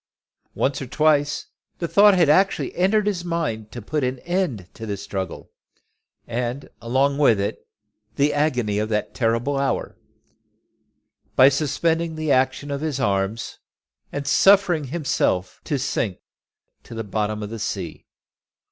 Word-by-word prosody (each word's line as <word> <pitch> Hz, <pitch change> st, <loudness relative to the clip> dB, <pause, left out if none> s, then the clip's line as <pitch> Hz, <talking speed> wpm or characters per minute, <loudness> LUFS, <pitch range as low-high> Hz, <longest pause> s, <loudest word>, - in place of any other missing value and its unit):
Once 135 Hz, +1 st, 0 dB
or 135 Hz, -, -5 dB
twice 150 Hz, +1 st, +2 dB, 0.3 s
the 170 Hz, -, -2 dB
thought 205 Hz, +3 st, +6 dB
had 175 Hz, -4 st, +4 dB
actually 190 Hz, +7 st, +2 dB
entered 200 Hz, +4 st, +2 dB
his 195 Hz, -4 st, -1 dB
mind 155 Hz, -12 st, -3 dB
to 120 Hz, -, -8 dB
put 150 Hz, +5 st, -2 dB
an 130 Hz, +1 st, -1 dB
end 170 Hz, -, -2 dB
to 110 Hz, -, -8 dB
the 100 Hz, -1 st, -3 dB
struggle, 95 Hz, -1 st, -6 dB, 0.7 s
and, 120 Hz, +3 st, -4 dB
along 135 Hz, +4 st, +1 dB
with 115 Hz, -8 st, +4 dB
it, 100 Hz, -, -3 dB, 0.5 s
the 145 Hz, +3 st, +2 dB
agony 125 Hz, -9 st, +1 dB
of 110 Hz, +1 st, -1 dB
that 105 Hz, -1 st, -1 dB
terrible 115 Hz, +4 st, 0 dB
hour, 140 Hz, -, -1 dB, 1.4 s
by 130 Hz, +1 st, +8 dB
suspending 160 Hz, +3 st, 0 dB
the 155 Hz, -2 st, -1 dB
action 130 Hz, +2 st, +1 dB
of 140 Hz, 0 st, -3 dB
his 155 Hz, -4 st, -2 dB
arms, 100 Hz, 0 st, -1 dB, 0.5 s
and 140 Hz, 0 st, -4 dB
suffering 185 Hz, 0 st, +4 dB
himself 130 Hz, -, -1 dB
to 145 Hz, -, -1 dB
sink 120 Hz, -7 st, -1 dB, 0.6 s
to -, -, -11 dB
the 115 Hz, -, -3 dB
bottom 105 Hz, +1 st, -2 dB
of 105 Hz, -, -6 dB
the 115 Hz, -, -5 dB
sea. 95 Hz, -6 st, -5 dB
135 Hz, 145 wpm, -23 LUFS, 110-155 Hz, 1.4 s, by